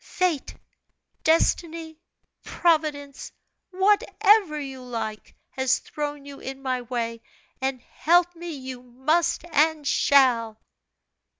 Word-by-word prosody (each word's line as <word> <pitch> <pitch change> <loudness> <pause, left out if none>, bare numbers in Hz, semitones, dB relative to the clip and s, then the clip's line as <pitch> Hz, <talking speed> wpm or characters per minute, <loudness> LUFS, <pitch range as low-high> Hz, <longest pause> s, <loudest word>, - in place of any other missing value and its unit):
Fate, 355 -6 -1 0.7
Destiny, 325 0 +1 0.4
Providence 305 -5 0 0.4
whatever 405 -3 +3
you 270 -2 -7
like 225 -4 -6 0.2
has 265 -1 +1
thrown 290 -1 -5
you 280 -1 -10
in 270 0 -8
my 255 -1 -1
way, 230 -2 -4 0.4
and 265 -1 -1
help 350 +2 +2
me 345 +1 -7
you 260 -4 -7
must 305 +8 0
and 305 0 +2
shall!" 240 -8 +3
285 Hz, 100 wpm, -25 LUFS, 260-330 Hz, 0.7 s, whatever